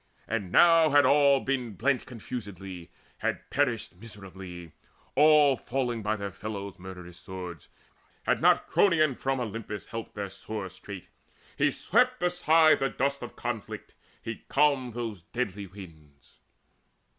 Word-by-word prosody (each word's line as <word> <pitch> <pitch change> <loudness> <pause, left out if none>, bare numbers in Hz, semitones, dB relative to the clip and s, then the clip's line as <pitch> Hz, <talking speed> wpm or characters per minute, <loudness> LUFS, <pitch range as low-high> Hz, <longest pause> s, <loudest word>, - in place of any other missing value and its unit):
And 105 -5 -3
now 165 -2 +6
had 145 -1 +5
all 140 0 +5
been 125 -5 -2
blent 130 +6 0
Confusedly, 100 -7 -7 0.3
had - - -2
perished 120 -9 0
miserably, 95 -5 -10 0.4
All 150 -1 +6
falling 125 -3 -2
by 105 +1 0
their 100 -2 -5
fellows' 100 -1 -6
murderous 90 -1 -10
swords, 90 -3 -8 0.5
Had - - +1
not - - +4
Cronion 155 -7 +3
from 135 +1 -1
Olympus 110 -3 -5
helped 115 -1 -7
Their 100 -2 -4
sore 100 0 -5
strait, 95 0 -9 0.6
and - - +4
he - - +5
swept 250 +1 +1
aside 165 -3 +4
the 135 - +1
dust 140 +1 -1
Of - - -8
conflict, - - -5 0.3
and 115 - -3
he - - -29
calmed 135 -5 +2
those 115 -6 -4
deadly 100 0 -4
winds. 80 -7 -15
115 Hz, 140 wpm, -28 LUFS, 95-140 Hz, 0.6 s, now